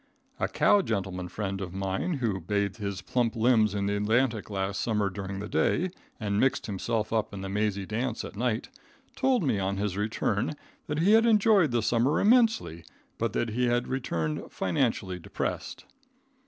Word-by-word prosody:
A -, -, +1 dB
cow 205 Hz, -, +4 dB
gentleman 95 Hz, -, -3 dB
friend 95 Hz, 0 st, -4 dB
of 95 Hz, -1 st, -6 dB
mine 95 Hz, -, -1 dB
who 115 Hz, -9 st, -1 dB
bathed 100 Hz, +2 st, -1 dB
his 100 Hz, -4 st, -4 dB
plump 120 Hz, +2 st, 0 dB
limbs 110 Hz, -3 st, +3 dB
in 100 Hz, -1 st, -1 dB
the 100 Hz, +1 st, 0 dB
Atlantic 110 Hz, +1 st, +1 dB
last 100 Hz, -1 st, -2 dB
summer 105 Hz, -4 st, 0 dB
during 95 Hz, 0 st, -5 dB
the 100 Hz, +1 st, -5 dB
day, 180 Hz, +10 st, +1 dB, 0.3 s
and 100 Hz, -2 st, -1 dB
mixed 135 Hz, +2 st, +2 dB
himself 110 Hz, +2 st, -2 dB
up 110 Hz, -2 st, 0 dB
in 95 Hz, -, -6 dB
the 95 Hz, -, -5 dB
mazy 100 Hz, -1 st, -1 dB
dance 115 Hz, +3 st, -2 dB
at -, -, -9 dB
night, 115 Hz, +1 st, -1 dB, 0.5 s
told 260 Hz, -6 st, +2 dB
me 130 Hz, -9 st, +1 dB
on 95 Hz, 0 st, -1 dB
his 100 Hz, -1 st, -2 dB
return 105 Hz, +4 st, -1 dB, 0.3 s
that 150 Hz, -, -2 dB
he 175 Hz, +6 st, +3 dB
had 225 Hz, +1 st, +6 dB
enjoyed 210 Hz, -6 st, +5 dB
the 120 Hz, -2 st, 0 dB
summer 120 Hz, +6 st, +2 dB
immensely, 220 Hz, -, +3 dB, 0.4 s
but -, -, -1 dB
that 120 Hz, -, 0 dB
he 125 Hz, +3 st, 0 dB
had 120 Hz, 0 st, +1 dB
returned 85 Hz, -, -2 dB
financially 95 Hz, -2 st, -1 dB
depressed. -, -, -4 dB
105 Hz, 175 wpm, -28 LUFS, 100-125 Hz, 0.5 s, had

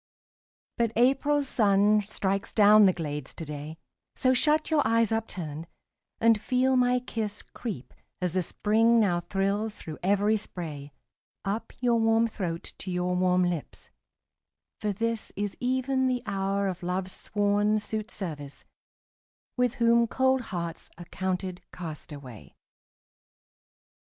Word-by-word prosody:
But 230 Hz, -1 st, +1 dB
April's 275 Hz, +4 st, +3 dB
sun 210 Hz, -2 st, +4 dB
strikes 195 Hz, -1 st, -2 dB
down 210 Hz, -1 st, +7 dB
the -, -, +5 dB
glades 150 Hz, -5 st, -4 dB
to 165 Hz, -, -6 dB
day; 150 Hz, +1 st, -7 dB, 0.4 s
So 255 Hz, 0 st, +3 dB
shut 305 Hz, +5 st, +2 dB
your 310 Hz, -2 st, +4 dB
eyes 225 Hz, 0 st, +2 dB
upturned, 170 Hz, -8 st, -3 dB, 0.5 s
and 225 Hz, -2 st, +4 dB
feel 260 Hz, +2 st, +2 dB
my 250 Hz, 0 st, +3 dB
kiss 220 Hz, -4 st, -4 dB
Creep, 205 Hz, -, -7 dB, 0.3 s
as 180 Hz, -2 st, -1 dB
the 185 Hz, -, +2 dB
Spring 225 Hz, +6 st, +3 dB
now 185 Hz, -5 st, +2 dB
thrills 200 Hz, +4 st, -1 dB
through 155 Hz, -2 st, -8 dB
every 205 Hz, +3 st, +2 dB
spray, 155 Hz, -8 st, -7 dB, 0.5 s
Up 215 Hz, +3 st, -3 dB
your 240 Hz, -2 st, +3 dB
warm 225 Hz, 0 st, +3 dB
throat 180 Hz, -7 st, -4 dB
to 190 Hz, -, -6 dB
your 180 Hz, 0 st, 0 dB
warm 180 Hz, 0 st, +3 dB
lips: 175 Hz, -4 st, -4 dB, 0.9 s
for 210 Hz, -1 st, -1 dB
this 230 Hz, +2 st, -2 dB
Is 205 Hz, 0 st, -3 dB
even 260 Hz, +1 st, +1 dB
the 250 Hz, -1 st, -1 dB
hour 195 Hz, 0 st, -1 dB
of 185 Hz, -1 st, -3 dB
Love's 180 Hz, +1 st, -2 dB
sworn 205 Hz, +1 st, +1 dB
suitservice, 190 Hz, -9 st, -5 dB, 0.9 s
With 250 Hz, -1 st, +1 dB
whom 235 Hz, -1 st, +4 dB
cold 260 Hz, +2 st, +2 dB
hearts 170 Hz, -3 st, -5 dB
are 175 Hz, -, -9 dB
counted 185 Hz, 0 st, -3 dB
castaway. 145 Hz, -8 st, -9 dB
205 Hz, 130 wpm, -28 LUFS, 180-230 Hz, 0.9 s, down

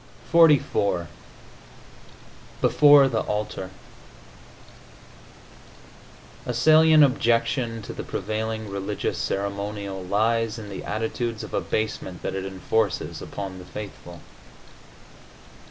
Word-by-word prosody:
XLIV 145 Hz, -, +4 dB, 1.5 s
BEFORE 145 Hz, -2 st, +6 dB
THE 115 Hz, -4 st, 0 dB
ALTAR 105 Hz, -3 st, -4 dB, 2.8 s
A 125 Hz, -, -1 dB
salient 155 Hz, +4 st, +6 dB
objection 115 Hz, -3 st, +1 dB
to -, -, -7 dB
the -, -, -6 dB
prevailing 110 Hz, 0 st, -4 dB
religious 100 Hz, -1 st, -3 dB
ceremonial 100 Hz, 0 st, -3 dB
lies 110 Hz, +4 st, 0 dB
in 105 Hz, -2 st, -8 dB
the 95 Hz, -, -7 dB
attitudes 115 Hz, +1 st, -3 dB
of -, -, -9 dB
abasement 110 Hz, -4 st, -3 dB
that -, -, -3 dB
it 95 Hz, 0 st, -4 dB
enforces 95 Hz, 0 st, -2 dB
upon 95 Hz, -2 st, -6 dB
the -, -, -10 dB
faithful. 90 Hz, -3 st, -9 dB
110 Hz, 90 wpm, -24 LUFS, 100-120 Hz, 2.8 s, BEFORE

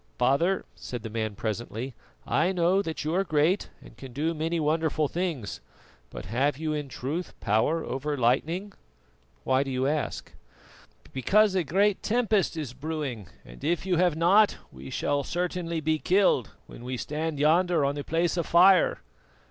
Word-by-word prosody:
"Father," 170 Hz, +8 st, +2 dB
said 120 Hz, -3 st, -7 dB
the 110 Hz, -, -6 dB
man 110 Hz, -2 st, -3 dB
presently, 115 Hz, +4 st, -4 dB, 0.3 s
"I 170 Hz, +4 st, +2 dB
know 180 Hz, +2 st, +2 dB
that 160 Hz, -5 st, -4 dB
you 155 Hz, +2 st, -1 dB
are 190 Hz, +2 st, +2 dB
great, 165 Hz, +3 st, +1 dB
and -, -, -15 dB
can 130 Hz, -2 st, -11 dB
do 155 Hz, +5 st, -1 dB
many 165 Hz, +2 st, -1 dB
wonderful 155 Hz, 0 st, +1 dB
things, 165 Hz, -, -3 dB, 0.5 s
but -, -, -8 dB
have 130 Hz, +7 st, 0 dB
you 155 Hz, 0 st, -2 dB
in 145 Hz, -2 st, -4 dB
truth 150 Hz, +8 st, -5 dB
power 110 Hz, +10 st, +1 dB
over 145 Hz, +3 st, -3 dB
lightning?" 160 Hz, -, 0 dB, 0.7 s
"Why 130 Hz, -, +2 dB
do 140 Hz, -, -3 dB
you 130 Hz, 0 st, -1 dB
ask?" 150 Hz, +2 st, -2 dB, 0.8 s
"Because 200 Hz, -, +3 dB
a 185 Hz, -2 st, +1 dB
great 195 Hz, +7 st, +2 dB
tempest 220 Hz, -7 st, +1 dB
is 145 Hz, -6 st, -4 dB
brewing, 140 Hz, -, -4 dB, 0.2 s
and -, -, -13 dB
if 175 Hz, +1 st, 0 dB
you 180 Hz, -3 st, +1 dB
have 175 Hz, -2 st, +3 dB
not 195 Hz, +6 st, +4 dB
we 65 Hz, 0 st, -10 dB
shall 145 Hz, -, 0 dB
certainly 175 Hz, 0 st, -2 dB
be 155 Hz, 0 st, 0 dB
killed 185 Hz, -, +2 dB, 0.2 s
when 120 Hz, -, -12 dB
we 125 Hz, +1 st, -4 dB
stand 155 Hz, +3 st, -3 dB
yonder 160 Hz, +1 st, +3 dB
on 140 Hz, -, +1 dB
the 145 Hz, 0 st, -5 dB
Place 170 Hz, +3 st, 0 dB
of 170 Hz, -, -1 dB
Fire." 180 Hz, +1 st, +5 dB
155 Hz, 165 wpm, -27 LUFS, 135-175 Hz, 0.8 s, Fire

